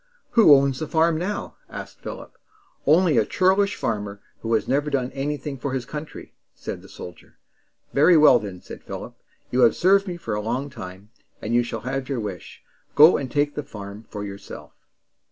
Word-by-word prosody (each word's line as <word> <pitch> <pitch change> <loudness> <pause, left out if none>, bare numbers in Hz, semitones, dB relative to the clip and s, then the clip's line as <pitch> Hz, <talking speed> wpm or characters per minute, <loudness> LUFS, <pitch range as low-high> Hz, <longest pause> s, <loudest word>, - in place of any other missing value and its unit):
"Who 205 -11 +8
owns 135 -1 +2
the 155 - -3
farm 160 +1 +2
now?" 195 +4 -4
asked - - -9
Philip. - - -9 0.5
"Only 160 -3 +5
a - - +4
churlish 190 - +2
farmer, 105 -2 -3 0.2
who 115 - -4
has 110 - -1
never 145 +3 +1
done 130 -3 -1
anything 140 0 -4
for 135 +1 -3
his 130 -2 -2
country," 150 0 -8 0.2
said - - -6
the - - -15
soldier. 90 - -11 0.6
"Very 160 +5 +6
well, 150 -5 +7
then," 95 -4 -8
said - - -10
Philip. - - -7 0.4
"You 125 - 0
have 120 -3 +5
served 195 +2 +4
me 175 -1 -4
for 115 -10 -5
a 105 - -1
long 125 +6 -3
time, 95 +1 -10 0.3
and 110 - -4
you 120 - +5
shall 115 -2 -5
have 130 +2 -4
your 135 -3 -1
wish. 100 -5 -7 0.3
Go 155 +4 +8
and 135 - -4
take 145 0 +1
the - - -3
farm 105 -5 -10
for 105 -1 -6
yourself." 100 -1 -9
135 Hz, 190 wpm, -23 LUFS, 110-155 Hz, 0.6 s, Who